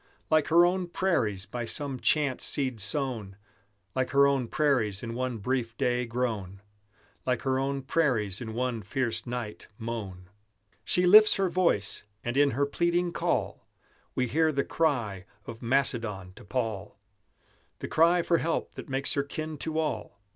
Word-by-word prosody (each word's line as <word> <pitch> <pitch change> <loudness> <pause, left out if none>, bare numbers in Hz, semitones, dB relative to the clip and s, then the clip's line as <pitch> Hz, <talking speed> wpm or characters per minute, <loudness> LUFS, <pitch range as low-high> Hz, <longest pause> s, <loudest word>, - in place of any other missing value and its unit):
Like 155 -1 +4
her 170 +2 +6
own 180 0 0
prairies 115 - 0
by 120 +1 -5
some 135 +1 -4
chance 145 -3 +1
seed 130 -5 +1
sown, 105 -3 0 0.6
Like 130 -1 -1
her 140 0 +5
own 135 -3 +1
prairies 120 -9 +1
in 115 -1 -4
one 125 0 -2
brief 115 +1 -2
day 125 0 0
grown, 110 -6 -3 0.6
Like 125 -2 -1
her 130 -1 +1
own 135 0 -2
prairies 125 - 0
in 110 -2 -6
one 125 -2 -1
fierce 120 +4 -2
night 120 -3 -5
mown. 100 -6 -6 0.6
She 180 - +2
lifts 215 +4 +8
her 195 -2 +1
voice, 170 - +1 0.2
and 120 +1 -3
in 145 0 +5
her 140 - +3
pleading 170 +4 0
call - - -2 0.5
We 125 - +1
hear 160 +5 +2
the 140 -2 0
cry 115 - -1 0.2
of 115 0 -9
Macedon 115 -7 0
to - - -14
Paul, 110 -3 -3 0.8
The - - -6
cry 170 +2 +4
for 170 -1 +2
help 165 0 -1
that - - -10
makes 135 +1 +1
her 140 - +1
kin 155 +2 -5
to 160 +1 -3
all. 140 -10 -3
130 Hz, 160 wpm, -28 LUFS, 115-150 Hz, 0.8 s, lifts